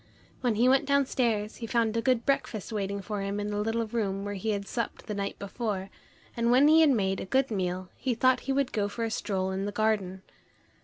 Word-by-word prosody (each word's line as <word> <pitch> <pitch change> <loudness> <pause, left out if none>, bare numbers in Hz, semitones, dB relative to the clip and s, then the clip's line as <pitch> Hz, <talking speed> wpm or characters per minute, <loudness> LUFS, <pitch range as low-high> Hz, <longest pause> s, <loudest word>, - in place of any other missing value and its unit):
When 245 -4 +1
he 235 +4 +3
went 265 +1 +4
downstairs, 245 -6 +1
he 230 - -6
found 230 -1 +1
a 230 - +1
good 250 -2 +1
breakfast 230 -6 -1
waiting 200 -1 -2
for 205 +1 -3
him 200 +1 -2
in 205 0 -3
the 205 0 -1
little 225 +2 0
room 205 -3 -2
where 205 - -3
he 200 +3 -3
had 200 -2 -2
supped 235 -2 -4
the 210 - -4
night 200 -1 -3
before, 200 -1 -4 0.4
and 235 0 +1
when 260 +4 +6
he 320 +1 +7
had 315 - +6
made 195 -7 +1
a - - -4
good 265 +5 +1
meal, 185 -2 -2
he 255 -3 -1
thought 255 +2 +3
he - - +4
would 270 -1 +1
go 205 -2 0
for 205 +3 -4
a 225 - -1
stroll 190 -3 -1
in 190 +1 -2
the 205 - -2
garden. 205 -3 0
215 Hz, 235 wpm, -28 LUFS, 200-240 Hz, 0.4 s, he